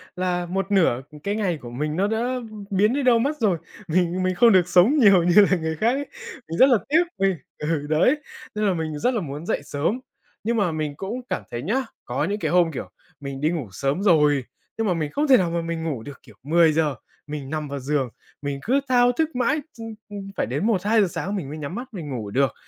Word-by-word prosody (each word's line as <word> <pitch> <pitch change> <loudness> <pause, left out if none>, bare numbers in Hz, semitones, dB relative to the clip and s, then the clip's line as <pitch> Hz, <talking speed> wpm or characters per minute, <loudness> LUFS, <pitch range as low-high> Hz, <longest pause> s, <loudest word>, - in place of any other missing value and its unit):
là 180 -1 -1
một 195 +3 -3
nửa 165 -11 +3 0.2
cái 200 +1 -1
ngày 190 -7 0
của 120 - -8
mình 150 +5 -3
nó 195 +4 +1
đã 235 +4 -1 0.3
biến 205 +3 +2
đi 280 +1 0
đâu 245 -2 +5
mất 285 +6 0
rồi. 205 -7 +2 0.3
Mình 180 +2 +1
mình 185 0 0
không 235 +3 +6
được 185 -3 +4
sống 190 +13 +5
nhiều 195 -7 +6
như 180 +4 +6
là 185 - +4
người 160 -1 -2
khác 220 +9 +2
ấy. 285 +2 -3 0.4
Mình 165 - -3
rất 265 - +7
là 245 - +5
tiếc 320 +4 +5 0.2
vì 195 0 +3 0.2
ừ, 150 -1 -2
đấy, 160 - +4 0.4
nên 210 0 0
là 195 - +3
mình 160 -3 -3
rất 250 - +1
là 230 - -1
muốn 150 0 -6
dậy - - -1
sớm. 150 - -1 0.4
Nhưng 230 +2 0
mà 200 -5 +2
mình 155 -2 -3
cũng 220 +6 -4
cảm - - -2
thấy 120 0 -4
nhá, 225 - 0 0.2
có 125 +4 -2
những 200 +6 -1
cái 155 -6 -1
hôm, 175 -2 +4
kiểu, 135 - -6 0.3
mình 140 -1 -6
đi 155 - +2
ngủ 160 -8 -3
sớm 135 - -1
rồi, 150 -7 +4 0.3
nhưng 225 - 0
mà 185 - +2
mình 155 -3 -2
không 295 +1 0
thể 260 - +7
nào 180 -2 +1
mà 170 0 -1
mình 165 -1 -4
ngủ 145 -9 -3
được. 145 +2 -10
Kiểu, - - -17
10:00 155 -2 +3 0.3
mình 145 -2 -6
nằm 155 0 -3
vào 140 0 -5
giường, 135 -1 -1 0.3
mình 140 -1 -3
cứ 265 +5 +2
thao 245 -1 +5
thức 315 +4 -1
mãi 270 +5 +1 0.2
ch - - -10 0.3
ưm, 205 -1 -6 0.2
phải - - +1
đến 140 - -2
1:00-2:00 210 0 +3
sáng 195 +3 -4
mình 165 -9 -4
mới 150 - -6
nhắm 150 +3 -5
mắt 245 +4 -5
mình 165 -7 -6
ngủ 115 -6 -4
được. 135 0 +2
175 Hz, 240 wpm, -23 LUFS, 150-215 Hz, 0.4 s, rất